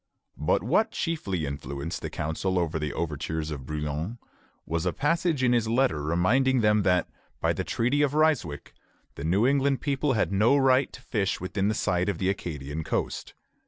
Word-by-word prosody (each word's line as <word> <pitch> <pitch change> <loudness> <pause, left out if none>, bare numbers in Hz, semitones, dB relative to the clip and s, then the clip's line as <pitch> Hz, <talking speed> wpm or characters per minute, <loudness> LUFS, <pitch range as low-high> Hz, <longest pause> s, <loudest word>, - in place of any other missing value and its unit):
But - - +1
what 220 - +2
chiefly 100 - -2
influenced 70 +2 -5
the - - -4
council 80 +5 -2
against 80 -2 0
the 75 -1 -2
overtures 80 0 -3
of 70 -3 -6
Brouillan 75 +7 -3 0.5
was 85 +2 -1
a 90 - 0
passage 160 -1 +1
in 125 -1 +4
his 115 -2 +2
letter 115 - +2
reminding 115 - +2
them 105 -1 +4
that, 90 -3 +2 0.3
by - - +1
the - - -2
Treaty 125 +5 +1
of 145 0 +1
Ryswick, 150 - +1 0.4
the 70 - -8
New 95 +8 +2
England 140 0 +2
people 140 -1 0
had 110 - +1
no 110 +8 +4
right 135 0 +3
to 130 - -11
fish 100 -6 -1
within 95 +3 -1
sight 90 0 0
of 100 - -1
the 95 +1 0
Acadian 75 -5 -4
coast. - - -3
95 Hz, 175 wpm, -27 LUFS, 80-130 Hz, 0.5 s, in